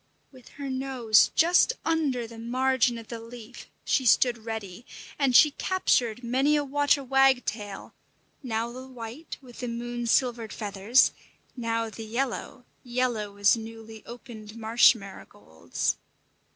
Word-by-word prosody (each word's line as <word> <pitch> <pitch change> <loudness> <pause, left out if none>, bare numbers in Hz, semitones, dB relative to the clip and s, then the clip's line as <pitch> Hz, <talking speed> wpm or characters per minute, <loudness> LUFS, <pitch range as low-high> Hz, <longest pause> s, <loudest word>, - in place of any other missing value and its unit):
With 255 -3 -17
her 280 -1 -7
nose 260 -4 +2
just 350 +8 +4
under 295 -7 0
the 225 0 -11
margin 255 +1 +1
of 230 -1 -11
the 235 - -6
leaf, 230 +1 -11 0.2
she 265 - +1
stood 240 0 +3
ready; 220 -2 -6 0.4
and 270 -3 +2
she 300 - +7
captured 250 - 0
many 265 +5 +2
a 295 - +1
water 285 0 +1
wagtail, 250 -6 0 0.5
now 230 -3 -3
the 255 +2 -9
white 250 +4 -9
with 245 -2 -14
the 245 - -4
moon 240 0 -4
silvered 235 -2 +1
feathers, 205 +4 +2 0.4
now 230 -2 -2
the 225 - -8
yellow 245 +2 -4 0.2
yellow 240 -5 -2
as 205 +2 +5
newly 225 -1 -10
opened 230 -3 -10
marsh 230 +2 +5
marigolds. 85 - -5
240 Hz, 135 wpm, -27 LUFS, 225-260 Hz, 0.5 s, she